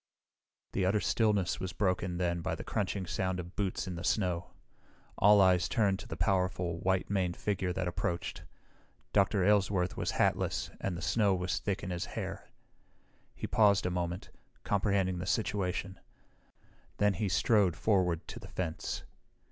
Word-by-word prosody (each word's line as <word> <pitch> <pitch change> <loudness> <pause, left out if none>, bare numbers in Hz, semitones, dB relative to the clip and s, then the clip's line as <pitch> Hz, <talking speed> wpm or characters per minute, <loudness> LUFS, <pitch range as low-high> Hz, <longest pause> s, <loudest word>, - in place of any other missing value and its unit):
The 95 - 0
utter 100 +3 +3
stillness 105 -4 +1
was 95 -2 -4
broken 90 -2 0
then 85 -1 0
by - - -2
the - - -7
crunching 100 -2 -2
sound 95 +1 -1
of 90 +1 -8
boots 100 -3 -1
in 90 - -3
the 85 0 -6
snow. 90 -3 0 0.7
All 105 +1 +7
eyes 90 -2 +4
turned 100 -4 +2
to - - -9
the 80 - -6
powerful, 90 -2 0
white 95 +2 0
maned 90 -3 0
figure 95 -3 -1
that 90 0 -2
approached. 85 0 -3 0.7
Dr. 100 -1 +3
Aylesworth 95 -2 +2
was - - -1
hatless - - 0
and 90 -3 -2
the 85 - -6
snow 100 +2 +3
was 90 0 -1
thick 100 +3 -2
in 90 - -4
his 85 -1 -2
hair. - - -5 0.9
He - - -5
paused 100 -3 +4
a 90 - 0
moment, 90 +1 -3 0.3
comprehending 100 -3 +1
the 90 - -4
situation. 95 -1 -1 1.0
Then 105 -1 +3
he 100 +2 -1
strode 100 -2 +3
forward 90 -6 +1
to - - -7
the - - -11
fence. 85 -4 -3
95 Hz, 160 wpm, -31 LUFS, 90-100 Hz, 1.0 s, All